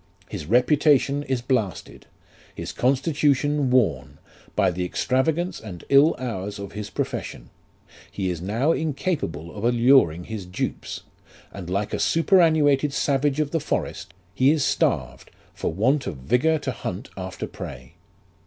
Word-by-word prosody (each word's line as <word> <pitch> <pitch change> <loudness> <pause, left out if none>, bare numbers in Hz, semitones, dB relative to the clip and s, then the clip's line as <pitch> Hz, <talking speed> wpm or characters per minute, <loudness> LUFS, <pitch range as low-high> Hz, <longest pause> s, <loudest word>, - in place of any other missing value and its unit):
His 75 - -7
reputation 140 - +3
is 130 -4 -2
blasted: 110 - -2 0.5
his - - -5
constitution 140 +1 +1
worn, 100 - +1 0.4
by - - +3
the 90 +1 -3
extravagance 145 - 0
and 95 -6 -9
ill 140 +4 +6
hours 105 -5 -4
of 100 0 -7
his 105 0 -6
profession; - - -5 0.6
he 95 -2 -2
is 85 -2 -5
now 115 - +1
incapable 145 - -2
of 105 - -7
alluring 120 - +4
his 100 -2 -7
dupes, 90 - -4 0.5
and 90 -3 -7
like 100 +3 -2
a - - -1
superannuated 155 -5 +3
savage 140 +1 +1
of 150 -1 0
the 165 - +1
forest, 90 -9 -4 0.2
he 130 +8 +3
is 150 -2 +2
starved 65 -2 -1 0.2
for - - -3
want 130 - +1
of 85 -7 -4
vigour 125 - +2
to 145 -3 -3
hunt 120 - -6
after - - -5
prey. 65 +4 -9
125 Hz, 140 wpm, -24 LUFS, 95-145 Hz, 0.6 s, ill